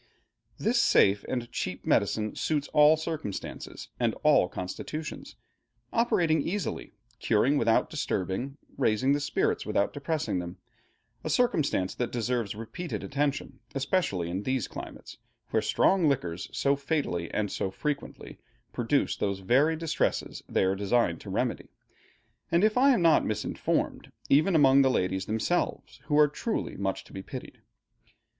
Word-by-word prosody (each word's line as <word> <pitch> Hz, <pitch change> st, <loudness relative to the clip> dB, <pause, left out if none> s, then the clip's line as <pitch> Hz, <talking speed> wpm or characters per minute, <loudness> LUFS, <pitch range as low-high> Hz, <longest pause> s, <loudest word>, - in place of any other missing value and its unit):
This -, -, +2 dB
safe 100 Hz, +1 st, +4 dB
and 120 Hz, -2 st, -3 dB
cheap 90 Hz, -, -4 dB
medicine 105 Hz, 0 st, +1 dB
suits 150 Hz, -2 st, -1 dB
all 150 Hz, +1 st, +6 dB
circumstances 155 Hz, -, -6 dB
and -, -, +1 dB
all -, -, +5 dB
constitutions, 150 Hz, -, -6 dB, 0.6 s
operating 170 Hz, -9 st, +2 dB
easily, 195 Hz, +6 st, -3 dB, 0.3 s
curing 115 Hz, +7 st, +2 dB
without 115 Hz, -5 st, +3 dB
disturbing, 120 Hz, +10 st, -3 dB, 0.2 s
raising 130 Hz, +2 st, +2 dB
the 145 Hz, -, +1 dB
spirits 145 Hz, 0 st, 0 dB
without 100 Hz, -, 0 dB
depressing 145 Hz, -, -2 dB
them, 90 Hz, +1 st, -6 dB, 0.7 s
a -, -, -3 dB
circumstance 155 Hz, -, +1 dB
that 125 Hz, -, -3 dB
deserves 120 Hz, -3 st, -1 dB
repeated 145 Hz, -, -6 dB
attention, 140 Hz, 0 st, -2 dB, 0.2 s
especially 135 Hz, -, 0 dB
in 90 Hz, +3 st, -3 dB
these 130 Hz, 0 st, -1 dB
climates, -, -, -9 dB, 0.3 s
where -, -, +2 dB
strong 185 Hz, -5 st, +3 dB
liquors 90 Hz, -10 st, -2 dB
so 140 Hz, 0 st, +1 dB
fatally 140 Hz, -, -2 dB
and 105 Hz, -2 st, -1 dB
so 95 Hz, -, -2 dB
frequently 145 Hz, +8 st, -5 dB, 0.3 s
produce -, -, +1 dB
those 100 Hz, -1 st, -1 dB
very 135 Hz, +11 st, +3 dB
distresses 165 Hz, 0 st, -1 dB
they -, -, +2 dB
are 95 Hz, 0 st, +2 dB
designed 100 Hz, -3 st, +1 dB
to -, -, -9 dB
remedy; -, -, -2 dB, 0.8 s
and 170 Hz, +3 st, +3 dB
if 215 Hz, 0 st, +3 dB
I 265 Hz, +3 st, +5 dB
am 240 Hz, -10 st, +3 dB
not 165 Hz, -1 st, +5 dB
misinformed, 110 Hz, -, -2 dB, 0.2 s
even 155 Hz, +6 st, +4 dB
among 140 Hz, -2 st, +6 dB
the 135 Hz, -, +4 dB
ladies 95 Hz, -5 st, 0 dB
themselves, 110 Hz, +11 st, -1 dB
who 150 Hz, -, +1 dB
are 150 Hz, 0 st, +7 dB
truly 215 Hz, +10 st, -3 dB
much 95 Hz, -1 st, -2 dB
to -, -, -18 dB
be 95 Hz, -, -5 dB
pitied. -, -, -9 dB
135 Hz, 140 wpm, -28 LUFS, 100-155 Hz, 0.8 s, are